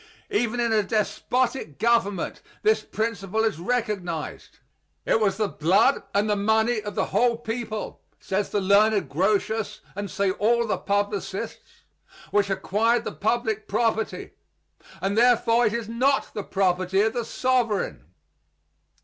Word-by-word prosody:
Even 245 - 0
in 235 -2 +1
a 215 - +4
despotic 225 - -1
government 210 -3 +1 0.2
this 435 +1 +3
principle 220 -1 -2
is 220 -8 0
recognized. 190 -7 -3 0.5
It - - +3
was 205 -3 +1
the 215 -1 +1
blood 190 - +3
and 205 +2 +2
the 210 - +2
money 220 +2 +2
of 205 0 -6
the - - +1
whole 240 -1 +3
people 225 -2 -5 0.2
(says 195 +1 -2
the 205 - 0
learned 200 +2 +3
Grotius, 210 +5 0
and 205 0 -4
say 200 0 0
all 235 +5 +2
the 215 - -1
publicists) 205 0 -3 0.5
which 205 -1 +2
acquired 220 +5 +1
the - - -4
public 220 0 -1
property, 220 +1 -1 0.7
and 195 +1 0
therefore 235 0 +4
it 210 - -1
is 235 -2 -3
not 260 +5 +1
the 210 - -3
property 185 0 +1
of 220 +1 +1
the 240 - -2
sovereign. 245 -4 0
215 Hz, 140 wpm, -25 LUFS, 200-235 Hz, 0.7 s, a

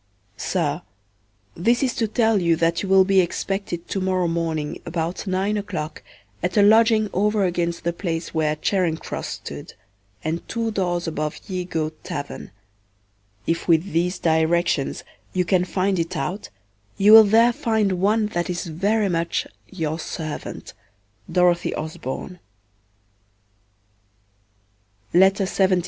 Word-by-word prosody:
SIR, - - -1 0.7
This 235 +9 +1
is 255 -3 +1
to 225 - 0
tell 220 -2 +2
you 170 -1 +3
that 165 +1 +1
you 195 - -4
will 190 0 +6
be 195 0 +4
expected 180 0 -3
to 195 - -2
morrow 185 -1 +1
morning 165 -3 -2
about 170 +3 -3
nine 195 +3 0
o'clock 180 -7 -5 0.4
at 180 +2 -1
a 205 - +6
lodging 220 +1 +5
over 210 +2 +2
against 175 -2 -1
the 170 - 0
place 170 -2 -4
where 155 -2 +1
Charinge 165 0 0
Crosse - - -5
stood, - - -8 0.5
and 160 +2 -2
two 230 -1 -1
doors 175 -4 -1
above 155 -1 -3
Ye 185 -3 -3
Goate 155 -3 -3
Taverne; 145 -5 -6 1.0
if 165 - -1
with 170 +3 +3
these 180 +3 0
directions 160 -2 +1 0.3
you 180 -1 +1
can 180 0 +2
find 190 0 0
it 165 +2 -2
out, 195 +4 -4 0.5
you 205 +2 +5
will 220 0 +11
there 225 +3 +4
find 220 -7 +1
one 215 +2 +3
that 175 -4 -2
is 175 -1 -3
very 200 +6 0
much 170 -2 -1 0.2
Your 160 -4 -3
servant. 155 -2 -6
180 Hz, 130 wpm, -23 LUFS, 165-205 Hz, 1.0 s, will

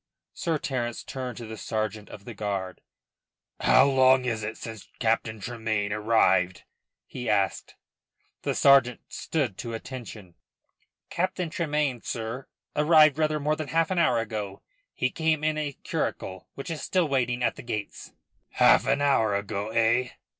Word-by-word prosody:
Sir 165 -4 -1
Terence 120 -5 -3
turned 130 -2 -6
to 120 - -7
the 110 0 -8
sergeant 110 -1 -3
of 100 - -11
the 120 - -7
guard, 100 -3 -4 0.8
"How 130 +1 +5
long 130 -1 +5
is 115 -3 -1
it 110 +1 -5
since 110 -3 -9
Captain 110 -1 0
Tremayne 110 -2 -2
arrived?" 105 -4 +2 0.4
he 125 -3 -5
asked. 100 -2 0 0.7
The - - -1
sergeant 135 -4 +5
stood 135 - -2
to 115 -2 -4
attention. 110 -6 -9 0.8
"Captain 180 -1 -1
Tremayne, 150 - -1
sir, 115 +3 -5 0.3
arrived 155 -1 +5
rather 155 -1 +1
more 150 +1 +1
than 155 -1 -5
half 165 +3 +1
an 185 - +1
hour 125 -8 +3
ago. 105 -3 -4 0.3
He - - 0
came 160 -2 0
in 155 0 +1
a 145 -3 -4
curricle, 95 -1 -3
which 140 +5 -6
is 160 - -4
still 180 -3 +1
waiting 125 -3 0
at - - +1
the - - -9
gates." 105 -4 -6 0.4
"Half 120 - +5
an 140 +1 +2
hour 115 -7 +3
ago, 100 +1 -3
eh?" 115 +2 +2
120 Hz, 155 wpm, -27 LUFS, 110-145 Hz, 0.8 s, How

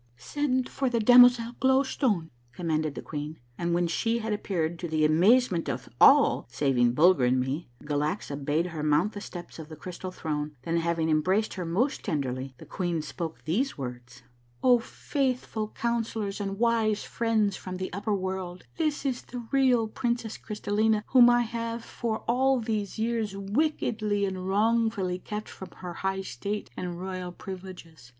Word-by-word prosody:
" 120 - -36 0.2
Send 260 -4 +1
for 270 -2 -1
the 235 -1 +1
damozel 245 0 +7
Glow 265 +1 +4
Stone," 210 - 0 0.2
commanded 155 -3 -1
the - - -6
queen, 150 +1 -5 0.2
and 170 +3 -1
when 175 0 +2
she 225 +7 0
had 220 -2 -2
apj^eared, 175 -5 -2
to 175 - -3
the 155 -1 +2
amazement 180 +4 +4
of - - -4
all - - +6
saving 125 -4 +2
Bulger 155 -1 +5
and 125 +1 +3
me, 130 +4 -3
Galaxa 145 0 -2
bade 150 +4 +1
her 155 - -4
mount 155 +7 +2
the 205 - -6
steps 175 -4 -9
of 155 -1 -8
the 155 - -8
Crystal 180 +4 -7
Throne, 150 -3 -4
then, 165 +3 0
having 165 -1 0
embraced 185 +8 +2
her 180 -2 -4
most 205 - 0
tenderly, 130 -2 -3
the - - -12
queen 175 -4 -2
spoke 165 0 -6
these 225 - 0
words: 125 -1 -8
— 120 0 -36
" 120 - -34
O 245 -2 +6
faithful 250 -3 -2
Councillors 225 -3 -2
and 195 -1 -3
wise 225 -2 +2
friends 220 -3 0
from 185 -1 -6
the 185 0 -5
upper 205 +2 -1
world, 185 -1 -4
this 305 -3 -1
is 255 -3 -1
the 245 -1 -8
real 255 -4 +3
princess 235 -1 -2
Crystallina, 210 0 0
whom 245 -2 +7
I 240 0 +4
have 230 0 -4
for 225 -2 -3
all 265 +2 +3
these 215 -4 -3
years 220 -3 -1
wickedly 210 -2 0
and 185 -1 -4
wrongfully 210 -2 +1
kept 210 +2 -6
from 190 - -9
her 180 -1 -6
high 190 +2 -2
state 200 - -5
and 175 -1 -5
royal 185 -1 -5
privileges. 180 -7 -10
195 Hz, 170 wpm, -28 LUFS, 160-230 Hz, 0.2 s, damozel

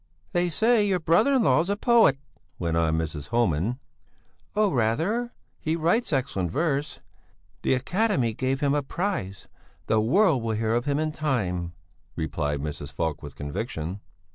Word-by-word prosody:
"They 175 0 +1
say 220 +6 +3
your 190 -2 +1
brother 170 - +3
in 255 - +3
law's 150 +6 +3
a 200 - 0
poet," 230 - +5 0.4
went 85 -2 -1
on 80 -1 +2
Mrs. 75 -3 -4
Homan. 115 0 +1 0.8
"Oh, 210 -2 +3
rather! 165 - 0 0.3
He 160 +1 -1
writes 170 +9 +1
excellent 120 - -1
verse! 145 - -1 0.6
The - - +2
academy 150 - 0
gave 130 +4 -1
him 140 -1 +2
a 145 - +2
prize; 140 - -3 0.4
the 110 0 +2
world 160 - +3
will 115 -1 -1
hear 110 +1 0
of 120 +2 0
him 140 0 +1
in 155 0 0
time," 95 - -2 0.4
replied 75 -3 -2
Mrs. 75 -1 -5
Falk 80 -3 -2
with 70 -2 -9
conviction. 80 - -4
130 Hz, 155 wpm, -26 LUFS, -, 0.8 s, poet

